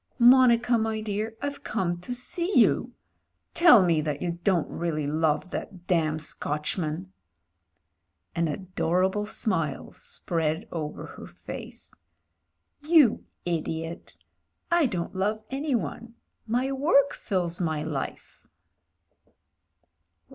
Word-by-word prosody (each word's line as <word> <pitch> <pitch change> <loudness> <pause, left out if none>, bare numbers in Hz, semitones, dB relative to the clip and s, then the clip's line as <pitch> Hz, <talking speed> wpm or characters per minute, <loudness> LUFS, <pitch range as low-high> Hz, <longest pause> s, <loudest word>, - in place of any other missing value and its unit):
"Monica, 245 -1 +6
my 220 0 -1
dear, 215 +1 -3
I've 285 0 -4
come 175 -5 -1
to 245 +8 -5
see 340 +10 -1
you. - - +4 0.6
Tell 245 - +7
me 165 -3 +3
that 150 -2 -2
you 170 0 -3
don't 180 -5 +2
really 155 -3 -2
love 155 +4 0
that 180 -3 -6
damn 160 -4 +1
Scotchman." 155 +4 -3 1.2
An 170 0 +1
adorable 185 +4 0
smile 165 - -2
spread 165 +4 -2
over 155 -3 -4
her - - -10
face. - - -9 0.9
"You 300 -6 +4 0.2
idiot! 165 -1 -3 0.6
I 340 -4 +4
don't 180 -3 -4
love 210 +3 -1
anyone. 235 - -2 0.3
My 250 +4 0
work 280 0 +3
fills 180 -4 -2
my 160 -3 -1
life." 155 -3 -6
185 Hz, 105 wpm, -27 LUFS, 165-235 Hz, 1.2 s, Tell